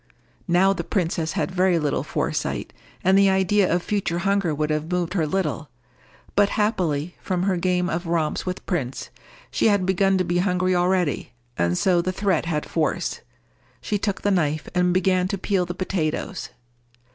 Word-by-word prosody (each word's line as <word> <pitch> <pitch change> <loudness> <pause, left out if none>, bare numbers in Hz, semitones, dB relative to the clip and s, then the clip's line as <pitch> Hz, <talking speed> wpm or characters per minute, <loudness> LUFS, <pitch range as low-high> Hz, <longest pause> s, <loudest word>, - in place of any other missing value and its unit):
Now 190 +3 +4
the 170 - -4
princess 165 -3 -1
had - - -1
very 185 -1 +3
little 150 -3 0
foresight, - - -2 0.3
and 190 +1 +4
the 195 0 +5
idea 190 +1 +2
of 175 +1 +1
future 200 -5 -1
hunger 195 -1 +1
would 150 +1 -1
have 155 +2 -2
moved 180 -1 -1
her 165 -5 +1
little; 155 -3 -2 0.7
but 205 0 +4
happily, 175 -7 0
from 180 -1 -1
her 190 -1 +1
game 180 0 +1
of 170 0 -3
romps 165 -2 0
with 185 0 -5
Prince, 135 -9 -3 0.4
she - - +2
had 200 -3 +3
begun 190 +1 +2
to 185 - +1
be 175 0 0
hungry 185 0 +1
already, 180 -5 0 0.2
and 85 +1 +1
so 180 -2 +3
the 185 - -1
threat 185 -4 0
had 150 -3 -1
force. 160 -2 -1 0.6
She 205 - -2
took 200 -1 -2
the 205 - +2
knife 155 -5 0
and 180 0 +2
began 185 0 +2
to 195 - -2
peel 185 -1 0
the 175 - -5
potatoes. 185 0 -2
180 Hz, 175 wpm, -23 LUFS, 165-190 Hz, 0.7 s, the